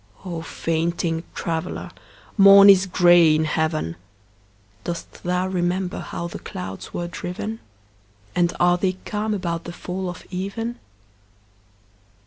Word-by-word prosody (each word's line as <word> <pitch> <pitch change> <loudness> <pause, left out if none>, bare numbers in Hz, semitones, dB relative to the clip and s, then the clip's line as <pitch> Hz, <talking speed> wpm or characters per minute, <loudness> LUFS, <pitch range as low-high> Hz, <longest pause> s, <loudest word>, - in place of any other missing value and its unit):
O 170 -3 -4
fainting 165 0 -1
traveller, 165 -1 -3 0.4
morn 200 0 +9
is 195 0 +4
gray 175 -3 +6
in 155 0 +1
heaven. 155 - -1 0.9
Dost 170 -1 -6
thou 180 +1 0
remember 180 0 -1
how 170 - -5
the 170 - -7
clouds 95 +1 -7
were 175 - -3
driven? 185 +6 -5 0.7
And 175 +3 +2
are 175 0 +4
they 185 0 +1
calm 210 0 -1
about 170 -3 -3
the 170 - -5
fall 185 +1 -4
of 180 - -9
even? 200 +6 -4
175 Hz, 120 wpm, -23 LUFS, 165-190 Hz, 0.9 s, morn